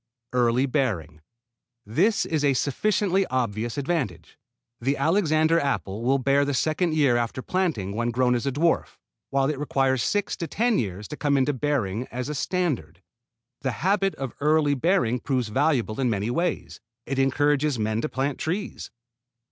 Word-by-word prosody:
Early 125 +1 +3
bearing. 100 - -2 0.6
This 180 - +2
is 155 -2 -1
a 140 -2 +3
sufficiently 195 +7 +1
obvious 115 -2 -2
advantage. 130 - -3 0.4
The 135 +4 0
Alexander 160 0 +3
apple 115 -8 -2
will 130 +3 +2
bear 140 +2 +2
the 140 -1 -1
second 155 +4 0
year 140 -6 +3
after 120 +2 -2
planting 160 - -1
when 120 +1 0
grown 125 +1 +2
as 125 +2 -1
a - - +1
dwarf, 165 +5 0 0.3
while 135 0 +1
it 150 -2 -2
requires 135 -3 +1
six 205 +8 0
to 170 - -4
ten 225 - +1
years 100 -1 -4
to 150 - -6
come 145 -2 +1
into 135 +2 +2
bearing 125 -5 -1
as 125 +3 -5
a - - -2
standard. 135 - -2 0.6
This 130 -3 -1
habit 195 - +1
of 135 -2 -5
early 150 0 +3
bearing 140 -4 +1
proves 125 -4 -1
valuable 130 -3 +1
in 130 -2 +2
many 105 +1 -1
ways. 170 +5 -2 0.3
It 135 +1 -2
encourages 145 +1 +2
men 110 0 -1
to 155 - -2
plant 135 +1 -2
trees. 190 +6 -3
135 Hz, 165 wpm, -25 LUFS, 120-155 Hz, 0.6 s, Early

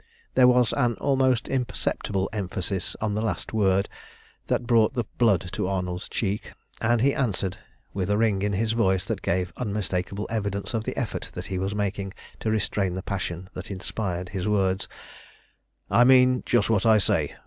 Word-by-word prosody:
There 130 -1 +6
was 125 -2 +4
an 120 -1 +1
almost 130 -3 +2
imperceptible 105 -6 -1
emphasis 95 -2 -3
on 110 -1 0
the 105 - -1
last 110 0 -3
word 100 -2 +2 0.6
that - - 0
brought 115 0 +3
the 120 - +1 0.2
blood 100 -6 +3
to - - -2
Arnold's 90 -2 -3
cheek, 105 -1 -2 0.3
and 120 0 +2
he 140 +2 +4
answered, 100 - -1 0.4
with 95 -1 -2
a 105 - +2
ring 105 -3 +2
in 100 0 0
his 110 +3 +1
voice 95 -5 +2
that 110 -3 -3
gave 90 0 -1
unmistakable 100 -3 -2
evidence 100 -2 -2
of 110 -1 -1
the - - -4
effort - - -3
that 90 - -6
he 95 - -1
was 95 +2 -2
making 100 -1 -2 0.3
to 110 - -1
restrain 100 -3 0
the 95 - -4
passion 95 -2 -4
that - - -7
inspired 95 -2 -4
his 95 -1 -3
words 95 -2 +1 1.0
"I 120 - +6
mean 125 0 +6
just 120 -4 +3
what 110 -4 +2
I 110 -1 +6
say. 100 - +1
105 Hz, 175 wpm, -26 LUFS, 95-115 Hz, 1.0 s, There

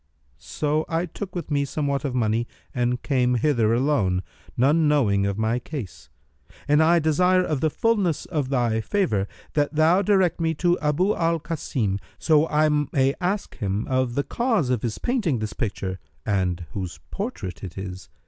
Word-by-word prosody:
So 150 - -1
I 165 +2 0
took 185 +2 -7
with 170 -3 -5
me 140 -1 +2
somewhat 140 0 -2
of 135 -4 -2
money 115 0 +1 0.3
and 125 0 0
came 125 -3 +2
hither 120 -3 +2
alone, 115 -8 +1 0.3
none 150 +5 +4
knowing 105 -10 +3
of 100 0 -2
my 110 +2 +1
case; 125 - -8 0.6
and 150 +2 +4
I 165 +2 +5
desire 180 +4 +3
of 150 -6 -1
the 155 - +3
fullness 200 -4 +1
of 150 -6 -2
thy 120 -4 +1
favour 110 - 0 0.3
that 145 0 0
thou 165 +5 +4
direct 190 -4 +2
me 160 0 +1
to 175 +3 +1
Abu 160 +7 +1
al 165 0 +1
Kasim, 135 - -2 0.2
so 155 -1 +3
I 155 0 +3 0.2
may 135 0 +2
ask 190 +3 -2
him 100 -1 -1
of 130 -2 0
the 140 - +1
cause 225 - 0
of 125 -4 0
his 115 -3 -3
painting 215 - 0
this 110 -1 -4
picture 95 -4 -3 0.3
and 90 -4 0
whose 95 -3 -5
portrait 195 - -5
it 95 -2 -7
is. 95 -4 -7
140 Hz, 170 wpm, -24 LUFS, 110-165 Hz, 0.6 s, I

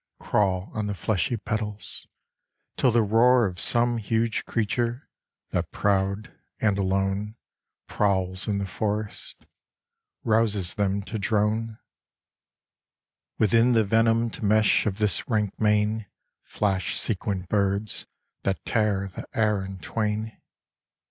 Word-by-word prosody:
Crawl 95 -2 0
on 105 -1 -2
the 100 - -3
fleshy 110 +3 0
petals, 105 -1 -3 0.7
till 130 - +3
the 115 -1 +3
roar 120 +3 +4
Of 90 -3 -4
some 120 0 +3
huge 115 +1 -1
creature, 120 +4 -1 0.4
that - - -1
proud 100 +2 0 0.2
and 105 -3 +1
alone 95 +2 -1 0.5
Prowls 95 -2 +1
in 105 -2 0
the 100 - -2
forest, 105 +2 -4 0.8
rouses 110 -5 +2
them 100 -1 0
to 110 +2 -5
drone; 110 +2 0 1.6
Within 115 +3 +4
the 115 -1 +4
venomed 115 +2 +1
mesh 110 +1 +3
of 100 -2 -1
this 105 +1 0
rank 105 -4 -1
mane 105 0 +1 0.3
Flash 95 -3 -1
sequined 95 -3 -2
birds 100 +1 0 0.3
that 95 -1 -2
tear 105 -3 +1
the 95 - -9
air 105 -3 +2
in 95 0 -7
twain. 110 +3 -3
105 Hz, 115 wpm, -26 LUFS, 100-110 Hz, 1.6 s, roar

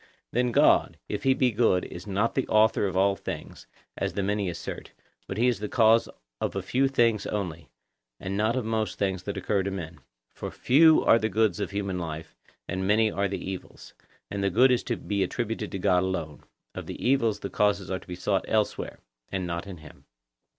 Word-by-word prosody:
Then 125 +1 +1
God, - - +4
if 105 - -3
he 135 0 +3
be 130 -2 +2
good, 105 -5 +2
is 90 +3 -9
not 105 +3 0
the 135 - -1
author 110 -1 +3
of 95 -1 -3
all 100 +1 +3
things, - - -7 0.3
as - - -2
the 100 - -1
many 100 -1 0
assert, 85 - -7 0.3
but 95 - -5
he 120 +3 +3
is 120 -4 +1
the 105 0 -4
cause 115 -1 +4 0.3
of - - -2
a - - -2
few 135 +2 +2
things 115 -5 +2
only, 85 -8 -4 0.5
and 95 +1 -4
not 110 +4 +1
of 130 -3 -1
most 110 -1 -1
things 95 -2 -1
that 100 +2 -5
occur 95 +1 0
to 95 - -2
men. 85 -4 -6 0.3
For - - -6
few 160 +5 +5
are 115 - +6
the 110 - 0
goods 105 -3 +1
of 100 - -2
human 100 -2 -3
life, 80 -5 -6 0.3
and 95 0 -2
many 110 +1 +3
are 100 0 0
the 100 0 -5
evils, 95 -1 -8 0.4
and 100 -1 -2
the 100 - +2
good 125 +8 +5
is 125 - +2
to 120 - -1
be 100 -1 -2
attributed 110 +2 -2
to - - -3
God 90 -1 +3
alone; 85 -5 -4 0.3
of - - -7
the - - -6
evils 115 -5 +1
the - - -5
causes 105 -2 +1
are 95 - -1
to - - -19
be 90 - -5
sought 95 +2 0
elsewhere, 110 -1 -1 0.3
and 95 -1 -2
not 85 +2 -4
in 95 -3 -8
him. 80 -1 -15
100 Hz, 215 wpm, -27 LUFS, 95-115 Hz, 0.5 s, are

